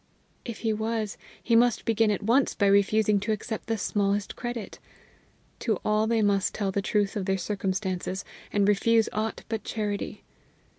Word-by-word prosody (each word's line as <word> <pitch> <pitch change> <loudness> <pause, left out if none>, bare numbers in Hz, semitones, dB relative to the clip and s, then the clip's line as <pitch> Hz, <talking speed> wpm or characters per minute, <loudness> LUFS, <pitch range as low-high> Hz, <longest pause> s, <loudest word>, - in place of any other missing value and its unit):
If 235 -3 -7
he 220 - +2
was, 220 -1 -2 0.3
he 235 - +2
must 235 0 +3
begin 225 -1 +3
at 205 0 -1
once 245 +6 +3
by 200 - +2
refusing 200 +1 +4
to 205 +3 -2
accept 215 +1 -4
the 225 -1 0
smallest 200 0 0
credit! 240 -3 -5 0.8
To 220 -5 0
all 215 +1 +2
they 225 -1 +2
must 200 -2 +1
tell 200 -2 -1
the 200 - 0
truth 205 0 0
of 200 -3 -2
their 195 0 +2
circumstances, 190 -1 -2 0.3
and 200 -1 +2
refuse 220 +2 +3
aught 215 +1 -2
but 220 -1 -3
charity. 210 -2 -3
210 Hz, 165 wpm, -27 LUFS, 200-225 Hz, 0.8 s, refusing